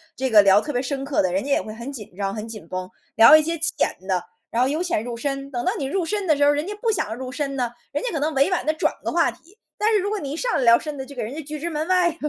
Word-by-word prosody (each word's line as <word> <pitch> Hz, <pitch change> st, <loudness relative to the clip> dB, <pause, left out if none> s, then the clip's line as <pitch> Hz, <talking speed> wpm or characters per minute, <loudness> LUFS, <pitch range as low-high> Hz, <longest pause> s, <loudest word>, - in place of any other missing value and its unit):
这 265 Hz, 0 st, -1 dB
个 215 Hz, -3 st, +8 dB
聊 200 Hz, +1 st, +5 dB
特 295 Hz, -, -4 dB
别 245 Hz, -2 st, 0 dB
深 270 Hz, +1 st, -3 dB
刻 275 Hz, 0 st, +1 dB
的， 185 Hz, -2 st, 0 dB
人 190 Hz, +2 st, 0 dB
家 -, -, -6 dB
也 -, -, +3 dB
会 215 Hz, -, -8 dB
很 235 Hz, +5 st, -7 dB
紧 215 Hz, -9 st, -10 dB
张、 195 Hz, 0 st, -2 dB
很 215 Hz, +1 st, -5 dB
紧 215 Hz, -6 st, -9 dB
绷， 185 Hz, +2 st, -5 dB, 0.3 s
聊 230 Hz, +7 st, +9 dB
一 310 Hz, -, +7 dB
些 330 Hz, +2 st, -2 dB
浅 330 Hz, -, +1 dB, 0.2 s
的。 185 Hz, -2 st, 0 dB, 0.3 s
然 235 Hz, +2 st, +1 dB
后 260 Hz, -, +2 dB
由 310 Hz, +4 st, -1 dB
浅 345 Hz, -12 st, -1 dB
入 235 Hz, 0 st, -5 dB
深， 275 Hz, +2 st, -4 dB
等 240 Hz, -2 st, -3 dB
到 370 Hz, -, +2 dB
你 -, -, -3 dB
入 330 Hz, +7 st, -1 dB
深 405 Hz, +3 st, -2 dB
的 310 Hz, -4 st, +3 dB
时 285 Hz, -, +4 dB
候， -, -, +6 dB
人 290 Hz, +1 st, +1 dB
家 410 Hz, -, -4 dB
不 460 Hz, -, +1 dB
想 295 Hz, -, -1 dB
入 255 Hz, +2 st, -6 dB
深 275 Hz, 0 st, -3 dB
呢？ 245 Hz, -2 st, 0 dB, 0.2 s
人 -, -, -2 dB
家 -, -, -2 dB
可 315 Hz, -, -2 dB
能 310 Hz, +2 st, 0 dB
委 275 Hz, +4 st, +4 dB
婉 365 Hz, -, 0 dB
地 310 Hz, -, +2 dB
转 315 Hz, -, 0 dB
个 -, -, -2 dB
话 340 Hz, -1 st, +3 dB
题。 370 Hz, +6 st, -15 dB, 0.2 s
但 430 Hz, +1 st, +2 dB
是 425 Hz, -, +4 dB
如 400 Hz, +2 st, -1 dB
果 425 Hz, -, -1 dB
你 280 Hz, -7 st, -5 dB
一 300 Hz, -, -4 dB
上 485 Hz, +6 st, -1 dB
来 -, -, +1 dB
聊 235 Hz, -1 st, +6 dB
深 300 Hz, -2 st, -6 dB
的， 265 Hz, -, -5 dB
就 280 Hz, -, -11 dB
给 260 Hz, -, -5 dB
人 230 Hz, +6 st, -6 dB
家 320 Hz, -, -4 dB
拒 305 Hz, +1 st, -7 dB
之 335 Hz, +4 st, -3 dB
门 310 Hz, -1 st, -2 dB
外 365 Hz, -1 st, +4 dB
了， 330 Hz, -, -6 dB
280 Hz, 365 characters per minute, -23 LUFS, 235-325 Hz, 0.3 s, 聊